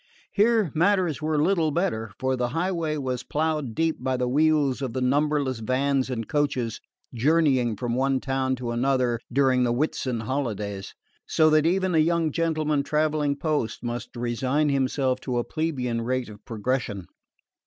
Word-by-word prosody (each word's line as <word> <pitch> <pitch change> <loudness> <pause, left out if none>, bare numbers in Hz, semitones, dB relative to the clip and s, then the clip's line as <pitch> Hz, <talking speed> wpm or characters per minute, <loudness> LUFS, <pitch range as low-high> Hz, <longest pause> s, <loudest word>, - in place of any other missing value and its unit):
Here 215 - +3
matters 175 -4 +2
were 155 -1 0
little 165 0 +2
better, 145 - -1
for 130 0 0
the 125 -1 -1
highway 165 +2 -1
was 130 -3 -2
ploughed 150 -3 -2
deep 165 -1 0
by 130 -1 0
the 125 0 0
wheels 145 -1 +2
of 130 -4 -3
the 130 - -2
numberless 140 -1 +1
vans 130 +3 0
and 115 -4 -3
coaches 130 -7 -1 0.3
journeying 130 -3 +2
from 120 +3 -3
one 135 +1 +1
town 135 -1 -1
to 120 -2 -4
another 125 -1 +1
during 130 -1 +3
the 120 - +1
Whitsun 130 -4 -1
holidays, 105 -6 -3 0.3
so 155 -1 +4
that 155 +1 +4
even 185 +1 +1
a 160 - +4
young 165 0 +2
gentleman 155 -2 0
travelling 150 0 0
post 145 -7 -2
must 120 0 -5
resign 130 +5 0
himself 130 -1 0
to 125 -2 -3
a 120 - +1
plebeian 130 -8 -2
rate 125 0 -2
of 105 -1 -13
progression. 115 -4 -2
135 Hz, 160 wpm, -25 LUFS, 125-155 Hz, 0.3 s, so